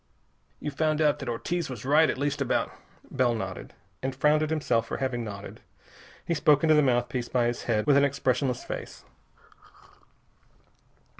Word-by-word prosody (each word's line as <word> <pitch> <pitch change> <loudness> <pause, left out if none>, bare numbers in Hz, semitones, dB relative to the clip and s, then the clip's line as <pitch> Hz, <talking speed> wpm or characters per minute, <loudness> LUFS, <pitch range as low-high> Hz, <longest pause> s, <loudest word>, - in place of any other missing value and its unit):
"You've 150 - -5
found 155 +1 0
out 150 -1 +2
that 140 -4 -5
Ortiz 165 +8 -2
was 125 -3 -7
right 155 +4 +5
at - - -1
least 140 +1 -1
about - - 0 0.2
" - - -26
Bell 120 -2 +1
nodded, 95 -4 -6 0.3
and 130 0 -3
frowned 150 +3 +3
at 155 - 0
himself 125 -8 0
for - - -4
having 130 -3 -2
nodded. 100 -2 -8 0.6
He 170 - 0
spoke 150 -2 +3
into 155 -1 +5
the 150 - +5
mouthpiece 120 -2 0
by 125 -2 +1
his 120 0 -2
head 110 -3 +1
with 140 -1 +5
an 140 - +5
expressionless 130 -2 0
face. - - -7
135 Hz, 170 wpm, -27 LUFS, 120-150 Hz, 0.6 s, right